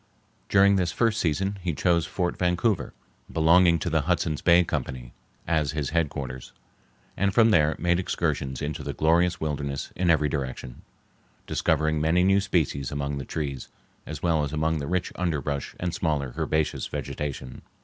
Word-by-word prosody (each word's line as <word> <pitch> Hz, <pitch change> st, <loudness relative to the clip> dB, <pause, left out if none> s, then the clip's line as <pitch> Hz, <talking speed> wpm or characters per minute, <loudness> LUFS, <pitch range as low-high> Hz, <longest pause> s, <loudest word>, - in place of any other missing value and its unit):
During 100 Hz, 0 st, +5 dB
this 90 Hz, -3 st, 0 dB
first 115 Hz, +1 st, +1 dB
season 95 Hz, +5 st, -1 dB
he 85 Hz, -3 st, -2 dB
chose 85 Hz, -1 st, +2 dB
Fort 90 Hz, -2 st, -2 dB
Vancouver, 90 Hz, +4 st, 0 dB, 0.4 s
belonging 85 Hz, +2 st, +5 dB
to -, -, -3 dB
the 80 Hz, -, +2 dB
Hudson's 80 Hz, -1 st, -1 dB
Bay 85 Hz, 0 st, +5 dB
Company, 65 Hz, -6 st, -4 dB, 0.3 s
as 80 Hz, -3 st, 0 dB
his 75 Hz, -2 st, -2 dB
headquarters, 70 Hz, -6 st, -3 dB, 0.6 s
and 100 Hz, +1 st, +1 dB
from 115 Hz, +1 st, +5 dB
there 80 Hz, -5 st, +3 dB
made 85 Hz, +1 st, +1 dB
excursions 65 Hz, -7 st, -2 dB
into 75 Hz, 0 st, -3 dB
the -, -, -4 dB
glorious 85 Hz, +2 st, +2 dB
wilderness 70 Hz, -3 st, -3 dB
in 90 Hz, -1 st, 0 dB
every 75 Hz, -2 st, +4 dB
direction, 65 Hz, -4 st, -5 dB, 0.6 s
discovering 80 Hz, 0 st, +1 dB
many 85 Hz, +3 st, +3 dB
new 95 Hz, +1 st, +4 dB
species 80 Hz, -9 st, -1 dB
among 70 Hz, 0 st, -3 dB
the 70 Hz, -, -6 dB
trees 70 Hz, -4 st, -4 dB, 0.4 s
as -, -, -7 dB
well 80 Hz, -3 st, +2 dB
as 70 Hz, -, -3 dB
among 80 Hz, +1 st, 0 dB
the 70 Hz, -, -4 dB
rich 90 Hz, 0 st, -1 dB
underbrush 75 Hz, -5 st, -2 dB
and 90 Hz, -1 st, -2 dB
smaller 70 Hz, -6 st, -1 dB
herbaceous 80 Hz, -1 st, -1 dB
vegetation. 65 Hz, -3 st, -5 dB
80 Hz, 160 wpm, -26 LUFS, 70-90 Hz, 0.6 s, During